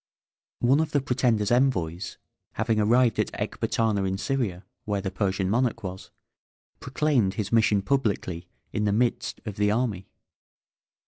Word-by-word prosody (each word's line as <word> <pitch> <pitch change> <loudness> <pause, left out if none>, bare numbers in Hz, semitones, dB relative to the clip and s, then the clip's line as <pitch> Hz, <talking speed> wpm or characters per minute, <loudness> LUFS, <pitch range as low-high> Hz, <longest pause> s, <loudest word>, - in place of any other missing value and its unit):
One 130 +4 +4
of 160 - -1
the 145 - +4
pretender's 120 -6 +1
envoys 95 -10 +1 0.4
having 110 0 0
arrived 115 +2 +3
at - - 0
Ecbatana, 110 -3 -1
in 95 0 -1
Syria, 105 -6 -2 0.2
where 105 -1 -1
the 95 -1 -3
Persian 95 -1 -1
monarch 115 +2 0
was, 95 0 -7 0.7
proclaimed 130 -8 +1
his 105 0 -3
mission 110 -3 +3
publicly 100 -10 -1 0.3
in 105 - 0
the 100 - +2
midst 120 +2 0
of 105 -3 -6
the 105 0 +2
army. 105 -4 -1
110 Hz, 140 wpm, -26 LUFS, 95-125 Hz, 0.7 s, One